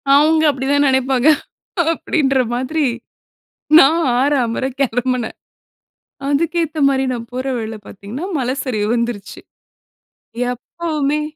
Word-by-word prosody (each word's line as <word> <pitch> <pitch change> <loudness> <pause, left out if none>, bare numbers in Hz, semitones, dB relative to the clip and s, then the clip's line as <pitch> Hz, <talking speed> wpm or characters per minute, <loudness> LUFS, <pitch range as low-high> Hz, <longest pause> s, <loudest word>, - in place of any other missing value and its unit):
அவுங்க 310 +2 +4
அப்பிடிதான் 285 +1 +1
நெனைப்பாங்க, 265 0 +2 0.6
அப்பிடின்ற 275 -4 0 0.2
மாதிரி. 280 +5 -1 0.9
நான் 320 +4 +5 0.2
ஆற, 280 +3 +2
அமற 230 +3 -2 0.2
கெளம்புனேன் 250 -1 -1 0.9
அதுக்கு 325 +4 +1
ஏத்த 315 0 -5
மாரி, 270 -1 +1
நான் 230 -1 -6
போற 255 +1 -3
வழில 220 -1 -4
பாத்தீங்கன்னா, 210 - -7
மல 250 -1 -1
சரிவு 215 -6 -1
வந்துருச்சு. 235 -4 -3 1.1
எப்பவுமே 300 +2 -2
265 Hz, 105 wpm, -18 LUFS, 245-300 Hz, 1.1 s, நான்